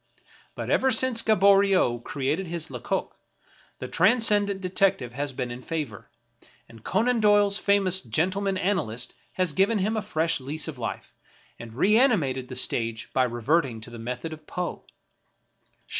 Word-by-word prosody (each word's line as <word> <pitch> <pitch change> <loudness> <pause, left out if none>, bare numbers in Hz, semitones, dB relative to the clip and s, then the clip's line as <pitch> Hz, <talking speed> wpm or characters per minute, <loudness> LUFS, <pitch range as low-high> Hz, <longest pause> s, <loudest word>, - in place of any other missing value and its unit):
But - - -4
ever 265 - +3
since 250 -1 +2
Gaboriau 195 - +4
created 145 +9 -2
his 165 -3 -5
Lecoq, 125 -3 -3 0.6
the - - -6
transcendant 205 0 +3
detective 185 -9 0
has 140 +2 -3
been 125 -1 -4
in 120 +1 -7
favor; 145 -9 -5 0.6
and 115 -1 -16
Conan 240 +1 +1
Doyle's 205 -1 +4
famous 195 -2 +2
gentleman 185 - -1
analyst 155 - -2 0.2
has 180 -5 -1
given 195 +7 +2
him 210 +3 0
a 215 - 0
fresh 165 -4 -1
lease 150 +5 -4
of 145 -5 -7
life, 115 -2 -5 0.5
and 115 -1 -10
reanimated 175 - +2
the 130 - -8
stage 115 -3 -2
by 130 -1 +3
reverting 120 +1 0
to 120 - -9
the 120 - -9
method 125 +7 -5
of 155 -1 -13
Poe. 180 -1 -4
165 Hz, 145 wpm, -26 LUFS, 125-200 Hz, 0.6 s, Gaboriau